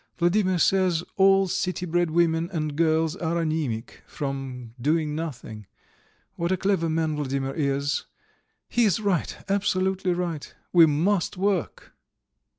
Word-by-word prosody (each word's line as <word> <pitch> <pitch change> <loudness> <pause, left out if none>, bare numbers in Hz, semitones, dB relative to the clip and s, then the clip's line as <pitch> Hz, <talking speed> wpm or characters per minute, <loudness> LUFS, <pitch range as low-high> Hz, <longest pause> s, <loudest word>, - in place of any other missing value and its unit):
"Vladimir 185 +1 +2
says 180 -1 +2
all 195 0 +5
city 180 0 -2
bred 175 0 +1
women 165 0 +1
and 155 -4 -2
girls 160 0 +2
are 165 0 -2
anæmic 155 -9 -2
from 135 -4 -5
doing 155 +2 +1
nothing. 120 - -6 0.7
What 170 +1 -1
a 185 - +2
clever 190 -3 +1
man 160 -1 0
Vladimir 135 -1 -2
is! 140 -1 -1 0.6
He 240 -1 +2
is 205 0 +2
right, 200 -6 -1
absolutely 190 -2 0
right. 175 -4 -4 0.2
We 170 -2 +8
must 175 +6 +1
work!" 195 -2 -2
165 Hz, 130 wpm, -25 LUFS, 150-185 Hz, 0.7 s, We